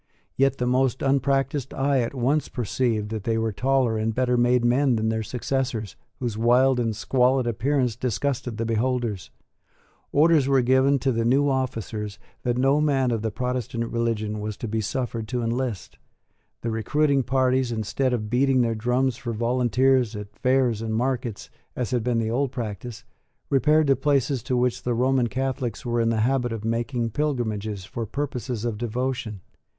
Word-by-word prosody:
Yet 135 0 +2
the 125 - -1
most 130 +1 +1
unpractised 135 0 0
eye 135 0 +2
at 120 +2 -2
once 135 +4 +1
perceived 115 -3 -1
that 110 -2 -4
they 115 +1 0
were 115 0 0
taller 125 0 +1
and 110 0 -1
better 125 -1 +2
made 120 0 +3
men 130 +1 +3
than 110 0 0
their 110 0 -1
successors, 125 -2 -3 0.2
whose 115 -4 -3
wild 125 +3 +4
and 115 -3 0
squalid 125 +3 +2
appearance 125 +1 0
disgusted 125 -1 -2
the 115 - -1
beholders. 115 -3 -1 0.8
Orders 155 -2 +4
were 135 -2 +3
given 130 +3 +4
to 135 +1 0
the 115 -1 0
new 135 +5 +3
officers 115 -6 -2 0.2
that 120 0 -1
no 135 +3 +3
man 135 -4 +2
of 115 -2 -1
the 110 - -1
Protestant 125 -1 -3
religion 110 -2 -1
was 105 -1 -4
to 115 - -5
be 110 +1 -1
suffered 115 0 -3
to 125 0 -2
enlist. 115 -3 -3 0.6
The 115 - -2
recruiting 140 +6 +1
parties, 130 0 +1
instead 115 +4 -1
of 110 -4 -2
beating 130 +3 +2
their 115 -1 +1
drums 125 +2 0
for 120 -3 -4
volunteers 125 +1 +2
at 105 0 -8
fairs 125 -4 +1
and 110 -1 -2
markets, 120 - -2 0.2
as 125 -2 -3
had 120 -3 0
been 120 0 0
the 110 -1 0
old 135 +2 0
practice, 120 0 -6 0.5
repaired 150 +4 +4
to 135 -1 +4
places 140 -3 +1
to 125 +3 -1
which 125 0 0
the 120 -1 -1
Roman 130 0 +2
Catholics 130 -2 -3
were 120 -1 0
in 115 - +2
the 115 -1 +1
habit 125 0 +1
of 110 -1 -5
making 115 +1 -1
pilgrimages 110 -8 -2
for 115 0 -5
purposes 125 -3 -3
of 110 -3 -2
devotion. 120 -3 -3
125 Hz, 175 wpm, -24 LUFS, 115-130 Hz, 0.8 s, wild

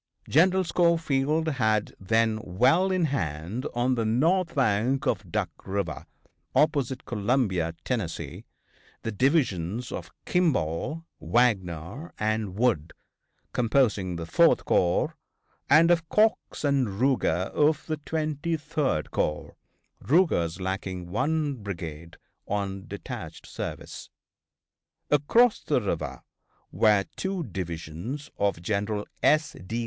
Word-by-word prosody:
General 185 +5 +4
Schofield 160 -3 +1
had 110 -8 +1
then 110 +3 +2
well 130 - +3
in 185 -3 +2
hand 90 - -3
on 125 +2 +2
the 115 -2 0
north 165 +11 +2
bank 130 +1 +1
of - - -1
Duck 105 -6 -1
River, 100 +1 -3 0.5
opposite 135 -4 +1
Columbia, 100 -7 0
Tennessee, 110 -10 -3 0.6
the 115 - -2
divisions 120 - +1
of - - -6 0.2
Kimball, 155 - 0
Wagner 95 - 0
and 110 -3 -1
Wood, 105 -9 +1 0.6
composing 110 -7 +2
the 85 -1 -5
Fourth 80 - +4
corps, 85 -1 +2 0.5
and 165 +2 +6
of 170 -2 +1
Cox 215 -5 +1
and 130 -9 +1
Ruger, 120 -9 +2
of 150 0 +2
the 155 -1 -2
Twenty 155 +2 -2
third 150 - -1
corps, 75 - -2 0.5
Ruger's 125 - +2
lacking 95 -1 -4
one 145 - 0
brigade 85 -6 -7 0.3
on 100 -1 -3
detached - - -7
service. - - -7 1.0
Across 210 - +4
the 150 -5 +2
river 85 -8 -3 0.5
were 105 -3 +3
two 190 -2 -2
divisions 90 - -6
of 100 -4 0
General 105 +2 -1 0.2
S. 155 0 +3
D. 110 +6 -3
115 Hz, 110 wpm, -27 LUFS, 95-150 Hz, 1.0 s, and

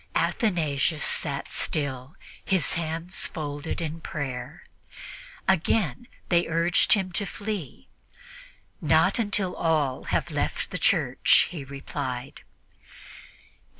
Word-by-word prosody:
Athanasius 160 - +1
sat 140 -3 -1
still, 140 -1 -1 0.3
his 190 -6 +2
hands 165 +2 -2
folded 145 -1 -4
in 165 0 -4
prayer. 135 0 -5 0.8
Again 190 - +1 0.2
they 175 -1 +3
urged 165 +1 +4
him 190 -3 +1
to 200 +3 -1
flee. 205 - -5 0.9
"Not - - +4
until 200 -4 0
all 150 -6 0
have - - -1
left - - -2
the - - -3
church," - - +4
he 165 -6 -5
replied. 135 -1 -5
160 Hz, 100 wpm, -26 LUFS, 140-180 Hz, 0.9 s, urged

